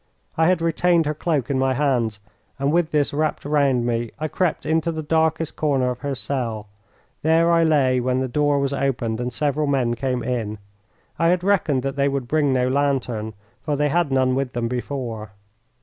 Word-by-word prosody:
I 160 0 +3
had 180 -2 +2
retained 165 0 +2
her 150 - 0
cloak 150 -4 -1
in 135 - 0
my 130 0 +1
hands, 120 -7 0 0.4
and 140 +1 0
with 170 0 +2
this 150 -3 +1
wrapped 155 0 -1
round 140 -5 +2
me 120 -1 -1
I 155 +2 -3
crept 180 -1 -1
into 160 +1 +1
the 160 -1 -4
darkest 160 +1 0
corner 135 -4 +1
of 125 - -6
her 140 -1 -3
cell. 120 -5 -3 0.6
There 165 +2 +3
I 165 0 +4
lay 140 -5 +3
when 125 +1 0
the 130 - -1
door 145 +3 +1
was 140 0 0
opened 120 -5 -1
and 125 0 -2
several 150 +2 0
men 130 -4 +1
came 125 0 -2
in. 115 -4 -2 0.6
I 165 - +3
had 180 +1 +2
reckoned 165 -10 +1
that 135 0 -3
they 140 0 +2
would 135 -3 -3
bring 150 0 +2
no 125 -1 +2
lantern, 130 -6 -1 0.3
for 150 0 -1
they 145 +1 +1
had 170 -1 +1
none 130 -1 +2
with 135 -1 -2
them 120 -1 -1
before. 120 -4 -4
140 Hz, 195 wpm, -22 LUFS, 125-155 Hz, 0.6 s, I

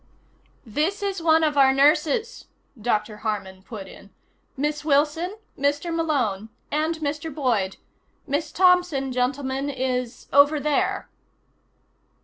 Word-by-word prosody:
"This 310 - -1
is 395 -3 -2
one 320 0 +4
of 295 -2 +2
our 265 -1 +7
nurses," 300 - +2 0.4
Dr. 215 -1 -1
Harman 205 -3 -4
put 195 -1 -9
in. 200 - -14 0.5
"Miss 295 +2 -1
Wilson, 310 +6 +1 0.2
Mr. 290 +5 0
Malone. 250 -11 -1 0.2
And 310 +2 0
Mr. 310 +1 -3
Boyd. 235 -10 0 0.5
Miss 290 +3 -2
Thompson, 355 -7 +3
gentlemen, 265 +2 -1
is 255 -2 -3
over 285 +2 +6
there." 295 0 0
285 Hz, 115 wpm, -24 LUFS, 250-315 Hz, 0.5 s, our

